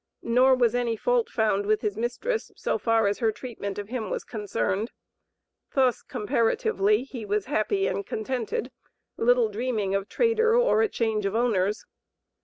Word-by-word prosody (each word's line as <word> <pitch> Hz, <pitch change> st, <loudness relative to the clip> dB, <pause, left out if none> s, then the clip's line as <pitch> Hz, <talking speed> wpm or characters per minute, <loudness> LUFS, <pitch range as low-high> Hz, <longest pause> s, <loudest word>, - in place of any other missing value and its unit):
Nor 255 Hz, +3 st, +4 dB
was 240 Hz, -3 st, +2 dB
any 240 Hz, -2 st, 0 dB
fault 485 Hz, -, +1 dB
found 210 Hz, -3 st, 0 dB
with 215 Hz, 0 st, +2 dB
his 210 Hz, -2 st, -1 dB
mistress, 245 Hz, -, -2 dB
so -, -, -1 dB
far 225 Hz, -2 st, +2 dB
as 200 Hz, 0 st, 0 dB
her 225 Hz, -3 st, +2 dB
treatment 210 Hz, -4 st, -6 dB
of 205 Hz, 0 st, -6 dB
him 230 Hz, -5 st, -3 dB
was -, -, -3 dB
concerned; 205 Hz, -, -2 dB, 0.9 s
thus, 260 Hz, -4 st, +3 dB
comparatively, 210 Hz, 0 st, +1 dB
he 260 Hz, -4 st, -8 dB
was 205 Hz, -1 st, -1 dB
"happy 390 Hz, -, 0 dB
and 200 Hz, -, -1 dB
contented," 235 Hz, +3 st, -3 dB, 0.4 s
little 245 Hz, 0 st, +3 dB
dreaming 215 Hz, -2 st, -2 dB
of 195 Hz, +1 st, -1 dB
trader 455 Hz, -1 st, +2 dB
or -, -, +4 dB
a 445 Hz, -, +2 dB
change 220 Hz, -, 0 dB
of 195 Hz, -, -3 dB
owners. 210 Hz, -4 st, +1 dB
225 Hz, 160 wpm, -26 LUFS, 210-255 Hz, 0.9 s, Nor